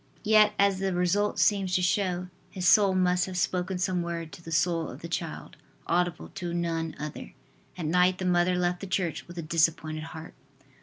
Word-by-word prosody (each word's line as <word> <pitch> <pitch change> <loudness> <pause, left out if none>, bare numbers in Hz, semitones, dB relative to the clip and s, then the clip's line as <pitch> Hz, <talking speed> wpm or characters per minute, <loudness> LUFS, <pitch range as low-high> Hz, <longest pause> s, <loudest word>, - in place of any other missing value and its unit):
Yet, 215 -1 +5
as 200 -1 +3
the 190 -1 -1
result 190 +4 +1
seems 195 -3 +2
to 180 - +1
show, 180 -1 0 0.2
his 180 -1 -2
soul 200 -2 +5
must 180 -1 +2
have 185 -1 -5
spoken 180 +1 -1
some 180 -1 0
word 170 -2 -4
to - - -11
the 165 - -9
soul 165 0 +1
of - - -11
the - - -4
child, 165 -2 -5 0.3
audible 175 0 -1
to 175 -1 -5
none 165 -2 -2
other. 150 - -7 0.4
At 170 - -4
night 180 +3 +3
the 185 - -4
mother 180 0 +2
left 180 0 0
the 195 - -7
church 180 -3 -2
with 175 0 -11
a 170 - -3
disappointed 155 -1 0
heart. 160 0 -9
180 Hz, 195 wpm, -27 LUFS, 165-185 Hz, 0.4 s, Yet